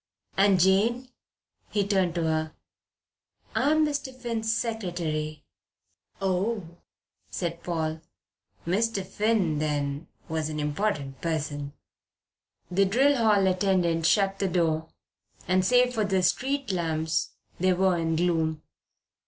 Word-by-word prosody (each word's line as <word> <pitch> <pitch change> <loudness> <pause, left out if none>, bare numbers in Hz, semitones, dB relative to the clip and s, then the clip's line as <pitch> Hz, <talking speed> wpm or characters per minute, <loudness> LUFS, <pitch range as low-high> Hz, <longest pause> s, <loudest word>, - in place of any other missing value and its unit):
"And 195 -1 +4
Jane?" 220 +8 +3 0.6
He 205 -2 0
turned 190 -4 +1
to 170 - 0
her. 160 -1 -1 1.0
"I'm 310 +2 +3
Mr. 285 -2 -2
Finn's 230 -3 -2
secretary." 175 -10 -2 0.8
"Oh," 190 -2 -2 0.5
said 170 -1 -4
Paul. 160 -2 -2 0.6
Mr. 200 +2 0
Finn, 195 -6 +1
then, 145 0 -2 0.2
was 160 -1 -2
an 155 -1 -4
important 150 -2 -2
person. 145 -3 -3 1.0
The 195 +2 +3
drill 265 +9 +3
hall 215 -5 +3
attendant 180 -3 +2
shut 195 0 +2
the 195 - +1
door, 165 -3 0 0.6
and 185 0 +3
save 250 +4 +4
for 220 -3 0
the 190 -2 +1
street 265 +8 0
lamps 160 -3 -1 0.3
they 185 +1 +3
were 185 0 +2
in 165 -1 0
gloom. 160 -2 0
185 Hz, 115 wpm, -27 LUFS, 160-210 Hz, 1.0 s, And